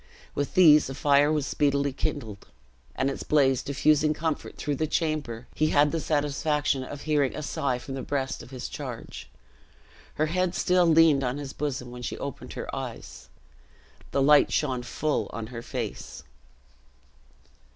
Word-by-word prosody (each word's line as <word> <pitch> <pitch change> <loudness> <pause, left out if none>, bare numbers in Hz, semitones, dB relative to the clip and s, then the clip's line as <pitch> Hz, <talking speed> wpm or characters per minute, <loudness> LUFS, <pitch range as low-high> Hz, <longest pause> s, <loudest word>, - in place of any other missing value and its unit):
With 145 - -3
these 155 -6 +7
a 135 - -5
fire 145 +1 +4
was 150 -3 0
speedily 140 -1 +1
kindled; 110 -7 -4 0.5
and 135 - 0
its 135 - -3
blaze 135 -4 +3
diffusing 150 +2 +2
comfort 160 0 -3
through 145 -2 -2
the 155 - 0
chamber, 150 -8 -2
he 155 - +1
had 145 -1 +3
the 165 - -1
satisfaction 150 -2 0
of 140 +2 -8
hearing 145 -4 +1
a 155 - -5
sigh 140 -5 -1
from 135 +2 -8
the 135 - -4
breast 135 -1 -3
of - - -12
his 130 -2 -6
charge. - - -7 0.9
Her 155 - +1
head 180 +3 0
still 180 -1 +3
leaned 160 -4 +5
on 125 +2 -1
his 140 -2 -6
bosom 130 -4 -4
when 125 0 -8
she 120 - -4
opened - - -7
her - - -5
eyes. 65 -1 -7 0.8
The 140 - +1
light 150 +1 +5
shone 130 -5 0
full 150 +5 -1
on 115 0 -5
her 115 - -5
face. - - -6
145 Hz, 160 wpm, -27 LUFS, 130-155 Hz, 0.9 s, these